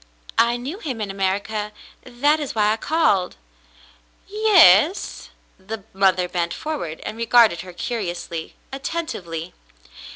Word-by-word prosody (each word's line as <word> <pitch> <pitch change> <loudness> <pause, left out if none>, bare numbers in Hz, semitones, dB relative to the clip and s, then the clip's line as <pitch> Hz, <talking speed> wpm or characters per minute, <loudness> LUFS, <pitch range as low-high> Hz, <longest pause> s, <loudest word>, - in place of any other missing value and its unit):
I 235 +1 +3
knew 280 +11 -6
him 265 - -5
in 205 -2 -3
America. 200 +2 -2 0.3
That 285 +5 +1
is 290 -5 -5
why 210 -1 +3
I - - -3
called." 255 - +1 0.9
Yes.'^" 385 - +4 0.3
The 215 +1 -6
mother 190 -2 +2
bent 170 -1 -2
forward 290 - -5
and 215 - -6
regarded 230 -5 +4
her 185 - -10
curiously, 175 -5 -5 0.2
attentively. 235 - -5
220 Hz, 120 wpm, -22 LUFS, 185-285 Hz, 0.9 s, Yes.'^